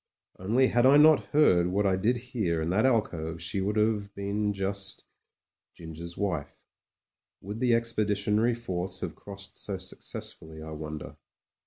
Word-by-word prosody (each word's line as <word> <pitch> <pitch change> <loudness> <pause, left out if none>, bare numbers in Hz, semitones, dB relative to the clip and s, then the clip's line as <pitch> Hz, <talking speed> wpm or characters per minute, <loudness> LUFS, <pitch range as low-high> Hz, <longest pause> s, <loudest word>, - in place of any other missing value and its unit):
Only 115 +8 +3
had 120 +2 +4
I 140 +2 +7
not 155 +1 +6
heard 90 - +4
what 100 +3 0
I 95 -1 +3
did 110 +7 +1
hear 110 -9 -2
in 80 +1 -1
that 110 +8 +3
alcove 85 -9 0
she 90 +3 -3
would 105 +2 -1
have 105 -2 0
been 100 +1 -1
just 100 0 -4 0.3
— - - -65
Ginger's 85 +1 -8
wife. 85 -8 -2 0.8
Would 105 +4 -6
the 120 -2 +3
Expeditionary 110 0 +1
Force 95 -6 -4
have - - -4
crossed 100 -1 -10
so 100 -2 -4
successfully, 80 -3 -7
I 80 0 -8
wonder 75 0 -7
100 Hz, 155 wpm, -28 LUFS, 85-115 Hz, 0.8 s, I